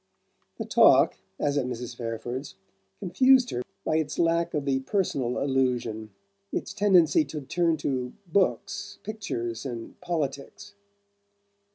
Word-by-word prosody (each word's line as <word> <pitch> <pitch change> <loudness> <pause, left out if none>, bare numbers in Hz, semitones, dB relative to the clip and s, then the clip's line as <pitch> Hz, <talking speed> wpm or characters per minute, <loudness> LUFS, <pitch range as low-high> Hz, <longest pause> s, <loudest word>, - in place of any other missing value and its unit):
The - - -4
talk, - - +5 0.2
as 145 0 +1
at 130 - -2
Mrs. 125 0 -5
Fairford's, 120 +3 -5 0.4
confused 255 - +4
her 120 - -2 0.2
by 155 - +2
its 155 -2 -2
lack 170 -1 +1
of 145 -2 -1
the 135 -1 +1
personal 135 - -1
allusion, 125 -5 0 0.4
its - - -3
tendency 200 - +4
to 155 - -6
turn 165 +3 +1
to 130 -4 -2
books, 200 +2 -1
pictures 120 - -4
and 120 -4 -7
politics. 165 +2 -4
145 Hz, 125 wpm, -27 LUFS, 125-180 Hz, 0.4 s, talk